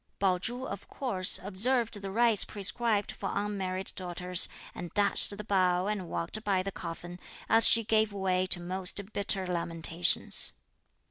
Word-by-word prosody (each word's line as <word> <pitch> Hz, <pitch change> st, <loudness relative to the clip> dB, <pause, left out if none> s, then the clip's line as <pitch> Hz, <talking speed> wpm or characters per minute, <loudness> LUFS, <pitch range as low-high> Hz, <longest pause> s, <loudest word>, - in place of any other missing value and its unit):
Pao 185 Hz, -2 st, +1 dB
chu, 245 Hz, +7 st, -3 dB
of 200 Hz, -, -8 dB
course, 195 Hz, -9 st, +1 dB
observed 215 Hz, +2 st, +1 dB
the 195 Hz, -, -6 dB
rites 225 Hz, +1 st, +4 dB
prescribed 210 Hz, +1 st, -1 dB
for -, -, -6 dB
unmarried 195 Hz, -2 st, -3 dB
daughters, 180 Hz, -1 st, 0 dB, 0.2 s
and 175 Hz, -, -8 dB
dashed 205 Hz, 0 st, +1 dB
the 210 Hz, -, -7 dB
bowl 185 Hz, -2 st, +1 dB
and 200 Hz, -5 st, -4 dB
walked 210 Hz, +6 st, -1 dB
by 195 Hz, -3 st, 0 dB
the 195 Hz, -, -5 dB
coffin, 175 Hz, 0 st, -8 dB, 0.3 s
as 225 Hz, 0 st, +7 dB
she 230 Hz, -, +4 dB
gave 220 Hz, 0 st, +1 dB
way 185 Hz, -2 st, -1 dB
to 180 Hz, -, 0 dB
most 185 Hz, +3 st, -2 dB
bitter 195 Hz, -1 st, -1 dB
lamentations. 170 Hz, -1 st, +1 dB
195 Hz, 150 wpm, -29 LUFS, 180-210 Hz, 0.3 s, as